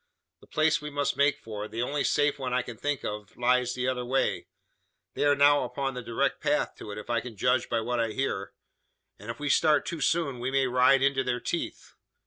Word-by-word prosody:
The - - -19
place 155 -1 +2
we 150 - -5
must 145 -1 -1
make 145 +1 +3
for 105 -1 -6
the 115 +2 -3
only 140 +3 -1
safe 145 0 +1
one 125 -2 -2
I 125 - +1
can 120 - -8
think 145 +4 -3
of 105 0 -6
lies 125 0 +2
the 125 0 -1
other 125 -1 -1
way. 130 +2 0 0.7
They - - 0
are 145 0 +5
now 145 0 +5
upon 135 +2 -3
the 125 - -5
direct 115 -1 -1
path - - +1
to - - -9
it, 105 - -6
if 105 - -6
I 115 -1 +1
can 115 -3 -9
judge 125 +4 +1
by 115 -1 0
what 120 +2 -2
I 115 - +2
hear; 105 -7 -2 0.7
and, 105 +3 -10
if 115 - -5
we 145 - -3
start 150 0 +3
too 165 -3 -4
soon, 155 -7 +1
we 125 +2 -2
may 135 0 +2
ride 130 +1 +4
into 135 -1 +2
their 125 -1 -1
teeth. 170 +7 -4
130 Hz, 230 wpm, -28 LUFS, 120-145 Hz, 0.7 s, are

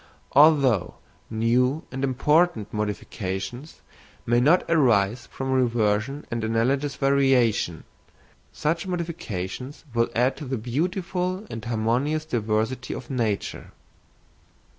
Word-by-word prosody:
Although 140 - +4 0.3
new 125 +6 +1
and 130 +1 -4
important 135 - +2
modifications 105 - -4 0.4
may 120 +1 +3
not 155 +9 +4
arise 120 -8 +2
from 135 0 -4
reversion 120 +1 +1
and 115 -1 -2
analogous 130 +6 0
variation, 135 - +2 0.7
such 165 +4 -1
modifications 145 - -5
will 115 0 +2
add 125 +3 +2
to 150 - -7
the 130 0 -2
beautiful 180 - -2
and 115 - -6
harmonious 120 +7 0
diversity 115 -1 -1
of - - -8
nature. 115 -6 -2
125 Hz, 100 wpm, -25 LUFS, 115-150 Hz, 0.7 s, Although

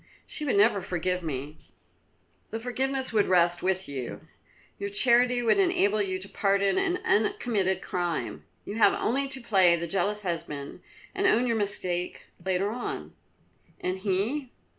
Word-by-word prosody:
"She 305 - -3
would 270 - +1
never 205 0 +4
forgive 180 0 -2
me." 150 -1 -5 0.9
"The 225 - -4
forgiveness 260 +2 -1
would 210 -2 +3
rest 175 -1 +3
with 190 0 0
you. 130 -4 -5 0.6
Your 200 0 -3
charity 245 +3 +4
would 235 - +3
enable 350 - +3
you 190 -2 -1
to 190 +1 -9
pardon 200 - +1
an 375 -2 +1
uncommitted 205 -3 +1
crime. 175 -2 -3 0.2
You 205 - -5
have 225 - +5
only 275 +4 0
to 265 0 -5
play 190 -7 +4
the 170 0 -3
jealous 200 +4 -1
husband 150 -5 -5 0.3
and 390 0 +1
own 250 -8 +3
your 230 -2 +1
mistake 185 -4 -2 0.2
later 190 +2 0
on." 240 +1 -5 0.7
"And 185 +1 -2
he?" 215 +9 -1
200 Hz, 150 wpm, -27 LUFS, 180-240 Hz, 0.9 s, have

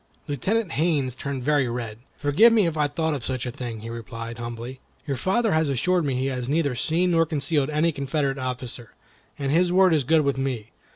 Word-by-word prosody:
Lieutenant 185 - -1
Haines 145 -5 +1
turned 135 0 -5
very 145 -1 +2
red. 115 -2 -4 0.2
"Forgive 150 +12 +5
me 220 -4 +4
if 165 -2 -1
I 150 -1 +2
thought 160 +2 -1
of 135 -5 -4
such 130 0 -2
a 125 - -3
thing," 120 -3 -6
he 115 - -7
replied, 115 0 -7
humbly. 120 +2 -6 0.3
"Your 140 -2 -1
father 195 - +1
has 160 -1 +2
assured 170 +6 +1
me 135 -2 0
he 130 +1 -1
has 130 -2 -2
neither 145 -2 +1
seen 170 +8 +1
nor 165 -1 +4
concealed 150 -2 0
any 155 +2 +2
Confederate 140 -1 -1
officer, 125 -3 -5 0.4
and 140 -1 -2
his 175 +3 +3
word 185 -1 +5
is 150 -3 +2
good 160 +5 +4
with 140 -2 0
me. 125 -5 -3
140 Hz, 210 wpm, -24 LUFS, 125-160 Hz, 0.4 s, Forgive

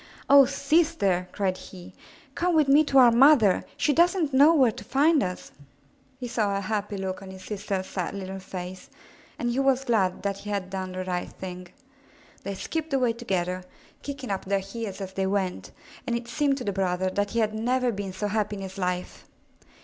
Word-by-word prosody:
''Oh, 280 -2 +8
sister!" 280 - +1
cried 190 -2 -1
he. 180 -2 -12 0.4
''Come 350 -1 0
with 305 -3 +4
me 285 +3 +6
to 275 - +1
our 245 -2 +8
mother. 235 -5 +5
She 295 - +2
doesn't 340 -2 +2
know 285 +4 +7
where 260 -6 +5
to 200 - -10
find 290 +7 +3
us." 180 -1 -4 0.7
He 250 - -4
saw 210 -4 0
a - - -2
happy 205 0 -3
look 190 0 -4
on 195 - -10
his 190 0 -10
sister's 200 -2 -3
sad 185 0 -4
little 190 0 -6
265 185 -1 -6
MYBOOK 180 - -6
HOUSE 185 - -11
face, - - -29 0.4
and 240 - -1
he 250 - -1
was 270 -1 +2
glad 195 -8 +1
that 200 -1 -2
he 205 - -8
had 195 -2 -3
done 185 -1 -4
the 185 0 -4
right 180 -1 -3
thing. 180 -1 -8 0.7
They 200 0 -5
skipped 315 +7 -3
away 250 -3 +2
together, 185 -6 -2 0.4
kicking 270 -5 -6
up 195 - -3
their 200 +1 +1
heels 195 +1 -6
as 190 -1 -6
they 190 0 -1
went, 190 -2 -2 0.4
and 235 - 0
it 235 0 -4
seemed 275 +3 +1
to 255 - -5
the 200 - -2
brother 185 -1 0
that 205 +2 -1
he 235 - -1
had 215 -1 +1
never 245 +3 0
been 200 -2 -5
so 190 +3 -4
happy 210 0 -1
in 195 - -6
his 190 +1 -8
life. 180 -1 -3
205 Hz, 210 wpm, -26 LUFS, 190-260 Hz, 0.7 s, Oh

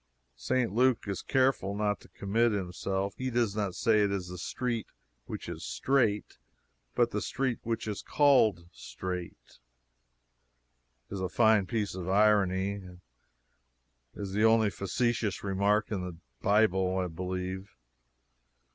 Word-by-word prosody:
St. 120 - 0
Luke 125 +1 +3
is 100 -2 -3
careful 130 -7 +1
not 105 0 0
to - - -16
commit 110 +3 +1
himself; 95 +1 -2
he 130 0 -1
does 115 -4 0
not 100 -4 -2
say 110 -3 +3
it 100 -1 +2
is 95 -3 -3
the 90 -1 -7
street 120 +3 -3 0.4
which - - -6
is - - -6
straight, 105 - 0 0.6
but - - +3
the - - -2
"street 130 -3 -1
which 115 -1 -3
is 105 -2 -3
called 120 - +3
Straight." 90 0 -7 1.5
It - - -5
is 100 - -4
a 95 - -1
fine 110 -4 +4
piece 110 -4 -1
of 95 -1 -5
irony; 100 -1 +3
it 90 -1 -11 1.2
is 100 -2 -5
the 105 +2 +1
only 110 -2 +5
facetious 110 +1 -1
remark 100 +2 +1
in 100 -3 -1
the 90 -2 -6 0.2
Bible, 95 -3 +3
I 95 - 0
believe. 95 +3 -5
100 Hz, 140 wpm, -30 LUFS, 95-115 Hz, 1.5 s, only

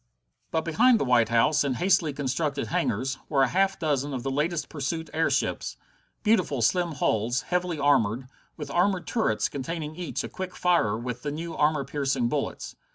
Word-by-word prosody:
But 160 - 0
behind 230 +8 +4
the - - 0
White 120 -3 +3
House, 120 +7 +3
in 135 -3 -1
hastily 175 -2 +2
constructed 140 0 -2
hangars, 130 +7 -1
were 140 -3 +3
a - - +4
half 195 +1 +2
dozen 145 -3 -1
of 125 - -4
the 135 - -2
latest 150 +3 -1
pursuit 160 +2 -4
airships 160 +1 0 0.5
beautiful 185 - +2
slim 175 - +2
hulls, 120 -2 0
heavily 180 -2 -1
armored, 130 -4 +2 0.3
with 150 -2 -6
armored 180 +1 +1
turrets 220 - 0
containing 155 +2 -5
each 175 0 -4
a - - -4
quick 185 -1 -6
firer 170 -13 +2
with 120 +1 -5
the 150 - -3
new 165 +3 -5
armor 150 -2 +2
piercing 135 -3 0
bullets. 145 0 -3
150 Hz, 170 wpm, -26 LUFS, 130-170 Hz, 0.5 s, behind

